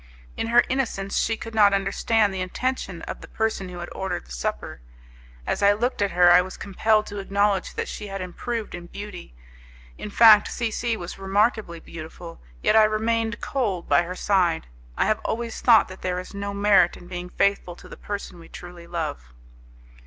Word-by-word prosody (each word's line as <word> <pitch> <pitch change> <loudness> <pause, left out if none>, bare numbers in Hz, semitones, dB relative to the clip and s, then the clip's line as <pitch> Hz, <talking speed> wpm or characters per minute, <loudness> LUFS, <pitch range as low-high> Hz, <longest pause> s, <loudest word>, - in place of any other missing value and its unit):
In - - -3
her 240 +1 +5
innocence, 225 -7 -1
she 225 - 0
could 225 0 -8
not 205 -2 +5
understand 205 +1 +1
the 190 - -3
intention 190 -2 -3
of - - -7
the - - -10
person 220 -4 -2
who 180 - -8
had 175 0 -6
ordered 190 - -4
the - - -17
supper. - - -4 0.6
As - - -2
I 200 0 +6
looked 235 +2 -2
at 200 - +2
her, 175 -1 +5
I 180 +1 +7
was 185 +1 -7
compelled 215 +2 +1
to 205 -1 -6
acknowledge 200 0 0
that - - -3
she 210 - -6
had 195 0 -5
improved 215 +5 -5
in 175 0 -8
beauty; 190 - -9 0.6
in - - -6
fact 215 0 +7
C 230 -2 -2
C 230 0 -1
was 175 +1 -8
remarkably 200 -2 0
beautiful, 165 +1 -10 0.2
yet - - +3
I 220 -1 +7
remained 225 +1 -1
cold 210 -10 -2
by - - +4
her 175 +1 -5
side. 180 -5 +1 0.3
I - - +2
have 215 - +1
always 230 0 -3
thought 230 -3 +6
that 185 - -11
there 180 -1 -2
is 185 - -9
no 200 0 -4
merit 200 -3 +3
in 175 - -14
being 180 0 -6
faithful 200 -2 0
to - - -14
the - - -10
person 200 -3 -6
we 165 - -14
truly 175 -1 -11
love. 155 - -5
200 Hz, 195 wpm, -24 LUFS, 180-220 Hz, 0.6 s, I